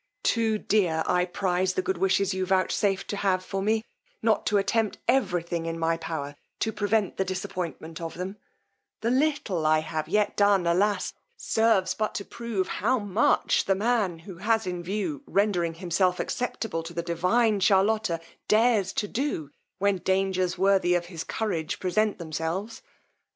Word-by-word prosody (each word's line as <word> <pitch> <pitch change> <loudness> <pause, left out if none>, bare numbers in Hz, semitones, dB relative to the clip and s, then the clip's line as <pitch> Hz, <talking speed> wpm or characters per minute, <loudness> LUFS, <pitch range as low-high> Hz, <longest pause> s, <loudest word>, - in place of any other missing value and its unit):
Too 225 -2 +2
dear 180 -7 +1
I 180 0 +2
prize 185 0 0
the 185 - 0
good 190 -2 -1
wishes 195 +1 +2
you 190 0 -1
vouchsafe 190 +1 +1
to 205 - -4
have 185 -2 +1
for 195 +1 -3
me, 220 +2 +1 0.4
not 225 -1 +2
to 210 - +3
attempt 215 +2 +1
every 200 -10 +2
thing 170 -1 -3
in 165 0 -3
my 165 0 +1
power 160 -3 -5 0.3
to 220 - +1
prevent 205 -1 0
the 190 - +2
disappointment 175 -3 -5
of 165 -1 -5
them: 185 +3 -5 0.6
the 230 - +1
little 265 - +1
I 155 0 +4
have 155 0 -4
yet 210 +4 +1
done, 200 -3 +4
alas! 200 +5 +1 0.2
serves 220 -5 +2
but 215 +3 -2
to 200 - -3
prove 230 -6 -3
how 250 +7 +1
much 205 -1 +2
the 195 - +2
man, 210 -4 +1
who 170 +2 -11
has 220 +3 +1
in 180 -1 -3
view 175 -5 -3
rendering 180 -5 +1
himself 180 +1 +1
acceptable 225 -7 -2
to 165 +1 -9
the 170 - -2
divine 195 +6 +2
Charlotta, 195 -2 +2 0.3
dares 215 -3 +3
to 210 - -1
do, 210 - -2 0.3
when 200 -1 +1
dangers 190 -1 0
worthy 190 -2 +3
of 175 -1 0
his 165 - -4
courage 175 -8 -2
present 210 +3 +1
themselves. 170 +6 -4
190 Hz, 165 wpm, -27 LUFS, 175-215 Hz, 0.6 s, I